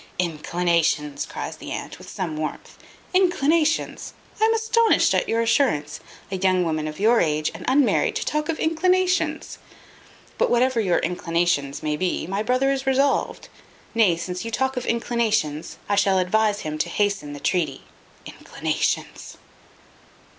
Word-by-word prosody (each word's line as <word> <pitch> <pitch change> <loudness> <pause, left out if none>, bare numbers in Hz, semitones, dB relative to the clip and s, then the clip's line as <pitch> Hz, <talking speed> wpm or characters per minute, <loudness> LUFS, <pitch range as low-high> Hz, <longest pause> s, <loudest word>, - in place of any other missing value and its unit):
"Inclinations!" 165 -3 0
cries - - -6
the - - -9
aunt, - - -6
with - - -12
some 170 -5 -4
warmth. 155 0 -5 0.4
"Inclinations! 330 -4 +1 0.3
I - - +6
am 450 - +3
astonished 450 0 +3
at - - 0
your 230 +1 +1
assurance. 225 - +1 0.3
A 190 - -1
young 185 -1 +2
woman 155 -1 -1
of 155 0 -7
your 225 +3 +4
age, 155 -1 0
and - - -9
unmarried, 270 0 +2
to - - -2
talk 300 0 -1
of 325 - -1
inclinations! 365 +3 +1 0.8
But - - +3
whatever 245 0 +2
your 185 -5 +2
inclinations 165 -5 -1
may 150 -1 -1
be, 185 +1 -1
my 195 +3 -2
brother 255 +4 +1
is 270 -1 -3
resolved; 275 +1 +1 0.5
nay, 210 -8 +3
since 180 +2 -5
you 230 - -4
talk 265 +3 -1
of 250 - -4
inclinations, 220 -10 -1
I 205 - 0
shall 195 -1 +3
advise 210 +3 +1
him 155 0 -5
to - - 0
hasten 200 -8 -1
the 145 - -8
treaty. 155 -5 -1 0.4
Inclinations!" - - -3
205 Hz, 150 wpm, -23 LUFS, 165-265 Hz, 0.8 s, I